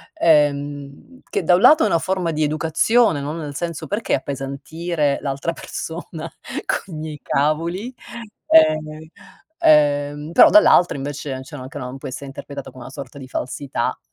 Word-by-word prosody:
ehm, 145 Hz, -, 0 dB
che -, -, -1 dB
da 180 Hz, -, +5 dB
un 180 Hz, -, +1 dB
lato 305 Hz, +7 st, +7 dB
è -, -, +3 dB
una -, -, +2 dB
forma 180 Hz, 0 st, -1 dB
di 155 Hz, 0 st, -1 dB
educazione, 160 Hz, +5 st, +2 dB
no, 145 Hz, +2 st, -4 dB
nel 150 Hz, -3 st, -6 dB
senso: 170 Hz, 0 st, -4 dB
"Perché 215 Hz, +2 st, 0 dB
appesantire 140 Hz, +3 st, -2 dB
l'altra 140 Hz, +4 st, -2 dB
persona 160 Hz, -1 st, -7 dB, 0.4 s
coi 190 Hz, -, -3 dB
miei 155 Hz, -1 st, -6 dB
cavoli?" 170 Hz, -, -1 dB, 0.5 s
Ehm 155 Hz, 0 st, +3 dB, 0.5 s
ehm, 145 Hz, 0 st, +3 dB
però -, -, +8 dB
dall'altra, 180 Hz, -, +6 dB
invece 140 Hz, -1 st, -5 dB
cioè 150 Hz, +3 st, -11 dB
anche, 130 Hz, +1 st, -8 dB
no, 125 Hz, +1 st, -6 dB
può -, -, -8 dB
essere 135 Hz, +2 st, -7 dB
interpretata 140 Hz, 0 st, -8 dB
come 130 Hz, -, -12 dB
una 130 Hz, -, -10 dB
sorta 135 Hz, 0 st, -9 dB
di 130 Hz, -, -9 dB
falsità, 130 Hz, +2 st, -3 dB
150 Hz, 155 wpm, -21 LUFS, 140-165 Hz, 0.5 s, però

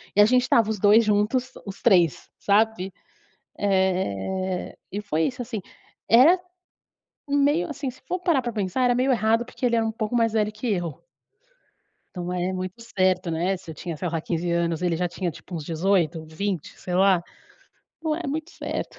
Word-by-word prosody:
e 205 Hz, -, +7 dB
a -, -, +8 dB
gente 250 Hz, +3 st, +4 dB
estava 230 Hz, -3 st, +3 dB
os 220 Hz, -2 st, -2 dB
2 210 Hz, +3 st, +6 dB
juntos 215 Hz, +5 st, +1 dB
os 195 Hz, -1 st, -8 dB
3, 175 Hz, -, +3 dB
sabe, 205 Hz, -2 st, +1 dB, 0.7 s
eh, 190 Hz, -, 0 dB, 0.2 s
e 205 Hz, -, -3 dB
foi 165 Hz, -6 st, -1 dB
isso, 250 Hz, +7 st, -2 dB
assim. 230 Hz, -3 st, -4 dB, 0.5 s
Era 285 Hz, +11 st, +7 dB, 0.9 s
um 285 Hz, -, +2 dB
meio, 290 Hz, +5 st, +2 dB
assim, 275 Hz, -2 st, -4 dB
se 260 Hz, -, -18 dB
for 365 Hz, -, -2 dB
parar 335 Hz, -7 st, +2 dB
pra 240 Hz, -1 st, -3 dB
pensar, 205 Hz, +3 st, -1 dB
era 245 Hz, -, +4 dB
meio 255 Hz, +2 st, +2 dB
errado 225 Hz, 0 st, +2 dB
porque 255 Hz, -, -8 dB
ele 235 Hz, -1 st, +3 dB
era 225 Hz, -1 st, +1 dB
pouco 215 Hz, +1 st, -3 dB
mais 230 Hz, -2 st, +2 dB
velho 210 Hz, -1 st, +1 dB
que 215 Hz, +4 st, -6 dB
eu. 175 Hz, -5 st, -3 dB, 1.1 s
Então 180 Hz, -1 st, -4 dB
é 180 Hz, +1 st, -1 dB
muito 185 Hz, +4 st, -5 dB
certo, 185 Hz, -5 st, 0 dB
né, 170 Hz, +4 st, 0 dB
se 180 Hz, -, -14 dB
eu -, -, -10 dB
tinha, 170 Hz, +2 st, -5 dB
sei 175 Hz, +2 st, -2 dB
lá, 165 Hz, -, -1 dB
15, 170 Hz, +1 st, -2 dB
anos, 170 Hz, -1 st, 0 dB
ele 175 Hz, -2 st, +1 dB
já 180 Hz, +2 st, 0 dB
tinha 175 Hz, +1 st, -3 dB
tipo 175 Hz, +3 st, -10 dB
uns 160 Hz, -, -4 dB
18, 165 Hz, -1 st, 0 dB
20, 170 Hz, +2 st, -4 dB
sei 180 Hz, -1 st, -4 dB
lá. 190 Hz, -2 st, +4 dB, 0.8 s
Não 315 Hz, -1 st, 0 dB
é 340 Hz, -2 st, -4 dB
muito 310 Hz, +4 st, -3 dB
certo. -, -, -5 dB
200 Hz, 190 wpm, -24 LUFS, 180-235 Hz, 1.1 s, a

